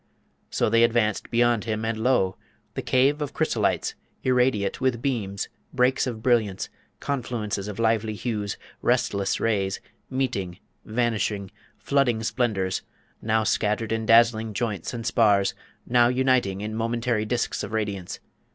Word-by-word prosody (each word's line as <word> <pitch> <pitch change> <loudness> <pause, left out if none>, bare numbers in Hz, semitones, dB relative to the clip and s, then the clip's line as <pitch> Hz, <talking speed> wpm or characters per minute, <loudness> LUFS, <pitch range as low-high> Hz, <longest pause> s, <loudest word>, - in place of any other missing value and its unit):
So - - +1
they 115 +1 +4
advanced 115 -3 +2
beyond 120 -2 +2
him, 110 -1 -2
and 115 0 0
lo! 110 -5 +2 0.4
the - - -3
Cave 140 +4 +2
of 145 - -3
Chrysolites - - 0 0.3
irradiate 125 -4 +1
with 130 -3 +1
beams, 110 -7 -2 0.3
breaks 130 +1 +2
of 110 -3 -5
brilliance, 110 -6 +1 0.3
confluences 110 -7 -3
of 105 - -6
lively 110 -1 +1
hues, 105 -3 -3 0.2
restless 100 -1 +1
rays, 100 -4 0 0.3
meeting, 115 -10 -2 0.3
vanishing, 110 -4 -1 0.3
flooding 125 -5 +1
splendours, 105 -6 0 0.4
now 110 0 +1
scattered 110 +1 0
in 110 -1 -1
dazzling 115 -2 +4
joints 105 -6 -2
and 115 -2 -5
spars, 105 -4 +3 0.3
now 120 0 +4
uniting 125 -6 +1
in 105 +1 -4
momentary 115 0 0
disks 120 +2 -1
of 100 - -5
radiance. 100 -5 -3
115 Hz, 135 wpm, -25 LUFS, 105-120 Hz, 0.4 s, they